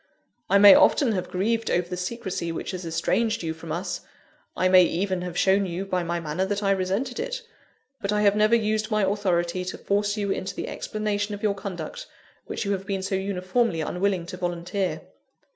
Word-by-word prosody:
I 200 - +5
may 200 0 +10
often 285 -3 +5
have 185 -4 -2
grieved 225 +5 0
over 175 0 +1
the 180 - -4
secresy 185 -2 -3
which 165 - -4
has 180 -2 -5
estranged 215 +7 0
you 160 -1 -2
from 160 0 -9
us; 175 +5 -3 0.6
I 185 - +3
may 185 0 +7
even 185 +2 -1
have 180 -1 -5
shown 195 0 +3
you 180 +2 -4
by 185 -2 -1
my 170 0 -2
manner 160 +3 -2
that 205 +2 -2
I 195 - +3
resented 195 +7 -1
it; - - -3 0.6
but 200 - -1
I 210 0 +1
have 200 0 +4
never 215 +2 +4
used 215 -1 0
my 215 -2 +1
authority 185 -3 0
to 180 - -5
force 205 +1 0
you 200 -2 -1
into 195 0 -3
the - - -4
explanation 210 -1 -2
of 205 - -12
your 210 -2 +2
conduct, 200 - -6 0.4
which - - -3
you 200 - 0
have 195 -1 -3
been 195 -1 -2
so 195 - -3
uniformly 190 0 0
unwilling 180 +2 -1
to 180 - -7
volunteer. 175 +2 -2
195 Hz, 200 wpm, -25 LUFS, 180-210 Hz, 0.6 s, may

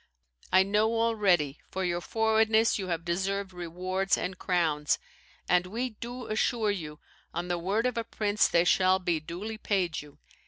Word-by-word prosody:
I 185 +1 +6
know 210 +3 +1
already 195 -11 +2
for 190 0 -2
your 175 0 -1
forwardness 220 +1 +2
you 190 - -4
have 170 -2 -3
deserved 190 +2 -2
rewards 185 +2 -1
and 185 +1 -3
crowns; 160 -5 +1 0.5
and 180 0 +3
we 240 +6 -3
do 240 +3 -7
assure 215 0 +1
you, 155 -6 -6 0.4
on 175 +1 -3
the 175 -1 0
word 200 +7 0
of 250 -2 0
a - - -1
prince, 210 -2 +1
they 170 - +3
shall 185 +1 +4
be 175 -3 0
duly 190 +8 -6
paid 185 -7 0
you. 145 -1 -15
190 Hz, 165 wpm, -29 LUFS, 175-220 Hz, 0.5 s, I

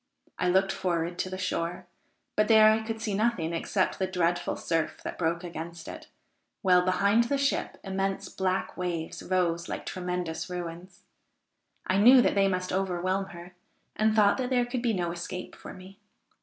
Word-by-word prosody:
I 180 - +2
looked 190 +2 +3
forward 175 -1 -2
to 185 - -1
the 185 - -5
shore, 180 -1 -3 0.5
but 215 0 +3
there 220 -1 +7
I 220 0 +1
could 225 0 -4
see 215 -2 -2
nothing 200 -6 0
except 185 +3 -1
the 190 - +1
dreadful 175 -1 0
surf 165 -2 -2
that - - -6
broke 170 0 0
against 165 -1 -7
it, - - -9 0.6
while, 180 -2 +5
behind 200 +5 +3
the 280 +4 0
ship, 275 0 -1
immense 195 0 -2
black 190 0 -2
waves 175 -3 -4
rose 170 -2 0
like - - -5
tremendous 180 -3 -4
ruins. 175 +1 -7 0.8
I 190 - +1
knew 250 +5 +8
that - - +2
they 195 -1 +3
must 185 -1 -2
overwhelm 185 0 0
her, 175 -1 -11 0.4
and 215 0 +2
thought 210 +2 +4
that 250 -1 -1
there 250 -2 +2
could 245 0 -3
be 235 -2 +1
no 175 -3 -1
escape 175 +1 -6
for - - -10
me. 190 +2 -13
185 Hz, 175 wpm, -28 LUFS, 175-205 Hz, 0.8 s, knew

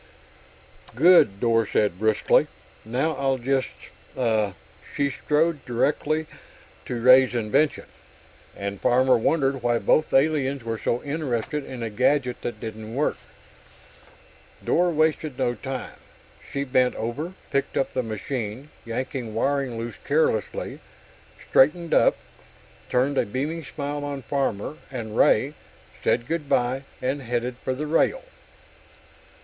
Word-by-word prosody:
"Good!" 140 - +6
Dor 115 -2 +2
said, 100 -3 +1
briskly. 110 0 +3 0.4
"Now, 130 +8 0
I'll 135 -1 +1
just.... 130 +1 0 0.5
Ah!" 110 -6 +1 0.4
She 140 -1 +1
strode 155 +2 0
directly 145 +5 0 0.6
to 120 - -3
Ray's 125 0 +6
invention, 120 +7 +1 0.7
and 100 0 -5
Farmer 130 +1 +4
wondered 135 +2 +1
why 120 0 +2
both 155 +6 +2
the - - +4
aliens 140 -2 +1
were 115 -1 -3
so 120 - -1
interested 145 -2 -2
in 125 -3 -6
a 115 - -3
gadget 125 +2 +1
that 120 - -5
didn't 110 0 -7
work. 145 +3 0 1.5
Dor 175 +1 +3
wasted 155 -3 0
no 120 - +1
time. 135 +1 -6 0.5
She 140 - -1
bent 130 -2 +2
over, 145 +11 -4 0.2
picked 140 - -1
up 135 - 0
the 130 - 0
machine, 115 +3 -5
yanking 115 -1 -4
wiring 135 0 0
loose 115 -1 -5
carelessly, 145 -7 0 0.7
straightened 165 +5 +3
up, - - +4 0.7
turned 135 +3 +2
a - - +2
beaming 150 +9 -3
smile 145 +1 -4
on 140 -2 -5
Farmer 135 +1 -2
and 115 -5 -6
Ray, 135 +7 +4 0.5
said 120 - +2
"Goodbye," 135 -4 0 0.2
and 135 +3 -1
headed 120 0 -2
for 130 0 -3
the 150 +3 -3
rail. 165 - +1
130 Hz, 125 wpm, -24 LUFS, 115-145 Hz, 1.5 s, Good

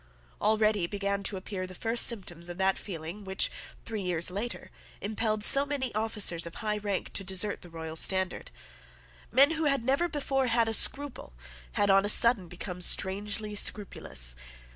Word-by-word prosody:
Already 215 -3 +1
began 200 +1 -3
to 200 0 -2
appear 185 0 -6
the 185 - -12
first 230 +4 +1
symptoms 175 -6 -4
of 175 - -8
that 190 0 +1
feeling 175 +2 -8
which, 190 0 0 0.3
three 220 -2 -5
years 180 -2 -1
later, 215 +6 -6 0.3
impelled 215 0 -2
so 275 +5 +6
many 280 -3 -4
officers 210 -6 +2
of 170 - -11
high 210 -1 -3
rank 200 -2 -4
to 195 - +2
desert 190 +2 +2
the 175 - -13
royal 160 -1 -8
standard. 190 +2 0 0.8
Men 275 +5 +6
who 320 -1 -2
had 275 -4 0
never 275 +7 +1
before 275 -4 -2
had 230 -1 +1
a 225 - -1
scruple 275 - +2 0.4
had 205 - +2
on 195 0 +4
a 205 - -2
sudden 220 -4 +4
become 180 +1 -8
strangely 205 +4 +2
scrupulous. 125 - 0
205 Hz, 165 wpm, -28 LUFS, 185-230 Hz, 0.8 s, so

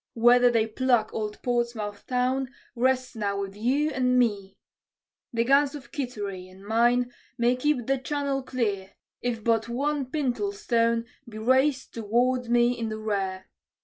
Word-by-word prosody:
Whether 245 +1 +6
they 230 -2 +2
pluck 235 0 +1
old 210 -1 -4
Portsmouth 235 -4 -2
town 255 +1 0 0.3
rests 255 +1 +1
now 200 -2 -2
with 195 0 -5
you 270 +8 +1
and 255 -2 +2
me. 205 -5 0 0.7
"The 230 -1 +1
guns 280 +3 +3
of 285 - -10
Kittery, 205 - -5
and 190 +2 -15
mine, 240 +3 +2 0.3
may 240 +1 +3
keep 255 -2 0
the 270 +1 +1
channel 280 0 -2
clear, 210 -7 -2 0.3
If 235 -3 -2
but 230 0 +1
one 280 +2 -1
pintle 300 +8 -1
stone 230 - +1 0.2
be 215 - -9
raised 260 +4 +2
to 230 - -5
ward 245 +3 +1
me 240 +1 +3
in 230 -2 -3
the 215 - -4
rear. 195 -3 -2
240 Hz, 155 wpm, -26 LUFS, 220-260 Hz, 0.7 s, Whether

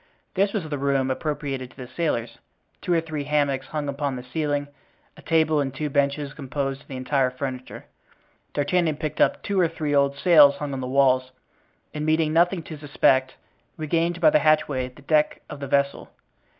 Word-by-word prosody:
This 195 +1 +2
was 200 -7 -3
the 145 -2 -4
room 135 -1 +1
appropriated 135 -2 -3
to - - -22
the 130 -2 -8
sailors. 120 -7 -2 0.4
Two - - -3
or 170 -1 +3
three 155 -3 -5
hammocks 140 -2 0
hung 150 -1 -3
upon 140 -1 -2
the 125 - -7
ceiling, 145 +2 -2 0.5
a - - -14
table 160 -2 +2
and 135 -1 -2
two 150 +2 -4
benches 140 0 0
composed 140 -1 -4
the 135 - -7
entire 130 0 +1
furniture. 130 0 -6 0.7
D'Artagnan 155 +2 +1
picked 155 0 -4
up - - +2
two 200 -1 0
or 175 - +4
three 155 -2 -3
old 140 0 +2
sails 150 -4 +6
hung 140 -1 -5
on 130 - -4
the 125 - -4
walls, 130 -1 +3 0.6
and 150 - -4
meeting 155 0 +1
nothing 175 +1 +3
to 155 -1 -9
suspect, 135 -2 +2 0.4
regained 165 +2 0
by 160 -2 +5
the 150 - +4
hatchway 150 -4 +2
the 130 +3 -16
deck 150 +1 +1
of 150 - -7
the 140 - -5
vessel. 140 +1 0
145 Hz, 185 wpm, -24 LUFS, 135-155 Hz, 0.7 s, sails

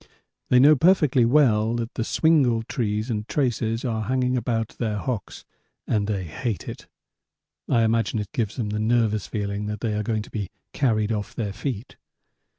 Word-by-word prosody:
They 125 - +5
know 145 +4 +7
perfectly 150 -6 +4
well 115 -4 +3
that 115 0 -3
the 115 - -2
swingle 130 -5 +3
trees 110 -1 -2
and 105 0 -3
traces 120 -3 -1
are 110 -3 -1
hanging 125 +1 +1
about 115 -2 -1
their 110 -3 -1
hocks 115 0 -4 0.4
and 105 -1 0
hate 100 - -3
it. - - -8 0.8
(I 115 - +3
imagine 115 -1 +1
it 105 -2 -4
gives 110 -4 -1
them 115 -5 -2
the 105 - -2
nervous 110 -2 +1
feeling 100 -1 -3
that 105 0 -4
they 110 -2 -1
are 105 - -1
going 110 -1 -1
to - - -15
be 105 -4 -4 0.2
carried 110 -5 +1
off 105 -2 -3
their 105 -4 -3
feet.) 120 0 -5
115 Hz, 170 wpm, -24 LUFS, 105-125 Hz, 0.8 s, know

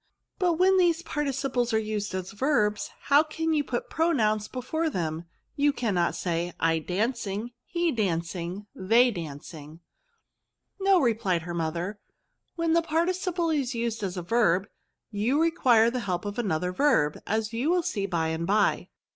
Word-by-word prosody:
But 360 -3 +3
when 375 +3 +4
these 345 -2 +2
participles 270 -6 -1
are - - +4
used 215 -2 -2
as 185 0 -4
verbs, 210 -3 +1
how 285 +1 +5
can 320 +1 -2
you 300 -2 +2
put 245 -3 -3
pronouns 215 -11 +1
before 315 +6 -2
them? 165 - -3 0.3
you 290 0 +3
cannot 200 -10 0
say, 175 0 -2
' - - -38
I 160 - 0
dancing, 210 +4 -2
he 345 -1 0
dancing, 180 - -2
they 230 +6 +4
dancing/ 155 -2 -8 0.3
'* 460 - -50
" - - -53
No," 385 -1 +5
replied 215 - +1
her 175 +1 -5
mother; 170 +5 -3 0.3
" - - -51
when 335 -1 +1
the 335 - +4
participle 340 +1 0
is 275 -5 -1
used 230 -1 -2
as 190 -2 -3
a 180 - -3
verb, 195 -2 +2 0.4
you 225 +8 +1
require 250 -9 +4
the 250 - -2
help 180 +2 -1
of 205 +3 -4
another 180 -5 -1
verb, 180 - +2
as 220 +1 -1
you 245 +7 0
will 355 0 +2
see 205 - -2
by 165 -3 0
and 160 +1 -2
by. 205 +1 +2
225 Hz, 170 wpm, -27 LUFS, 180-300 Hz, 0.4 s, how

